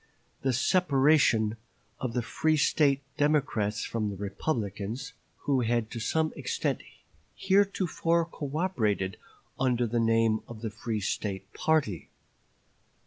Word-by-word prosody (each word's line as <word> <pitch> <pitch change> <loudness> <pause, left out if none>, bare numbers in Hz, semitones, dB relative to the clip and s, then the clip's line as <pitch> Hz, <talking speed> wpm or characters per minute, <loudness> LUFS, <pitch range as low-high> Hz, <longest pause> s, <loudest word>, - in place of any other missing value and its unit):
the 135 - +1
separation 135 - +3 0.4
of 125 -3 -3
the 120 - 0
free 155 +6 +1
State 140 -1 +3
Democrats 130 -8 +1
from 110 -2 -2
the 100 - -5
Republicans, 105 +3 -3 0.3
who 140 -3 +1
had 120 -1 0
to 115 - -5
some 155 +7 0
extent - - -2 0.5
heretofore 190 -4 +2
cooperated 140 - -1 0.4
under 125 -2 +2
the 120 +1 0
name 115 -1 +3
of 115 -2 -9
the 110 - -2
free 110 0 -3
State 95 0 -3
party." 150 - 0
120 Hz, 115 wpm, -29 LUFS, 110-150 Hz, 0.5 s, separation